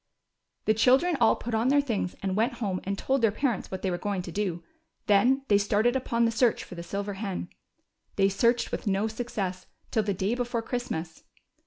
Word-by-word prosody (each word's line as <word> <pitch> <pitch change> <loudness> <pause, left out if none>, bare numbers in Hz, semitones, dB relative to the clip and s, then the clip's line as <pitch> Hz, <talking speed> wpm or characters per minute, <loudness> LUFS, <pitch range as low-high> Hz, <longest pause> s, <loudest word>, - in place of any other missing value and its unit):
The 215 - +4
children 260 +10 +4
all - - +5
put 240 - -6
on 225 +2 +2
their 285 +2 +5
things, 225 -10 -1
and 190 -1 -1
went 225 +4 +1
home 195 -5 -3
and 195 +1 -2
told 265 +4 0
their 225 - +5
parents 235 -1 -1
what 190 - -6
they 190 - +1
Avere 175 0 -3
going 200 -3 -2
to 175 - -7
do; 180 -3 -2 0.4
then 245 +6 +4
they 205 -1 +4
started 210 +4 +2
upon 235 -2 +1
the 230 - +2
search 230 0 +2
for - - -11
the 170 - -6
sih^er 200 +3 -4
hen. 195 -4 -4 0.7
They 195 -1 +4
searched 235 +5 +2
Avith - - -4
no 200 +2 +1
success 205 -5 -4 0.2
till 220 - +2
the 200 -2 -1
day 190 +5 0
before 245 -1 -2
Christmas. 180 -11 -4
210 Hz, 205 wpm, -27 LUFS, 195-240 Hz, 0.7 s, all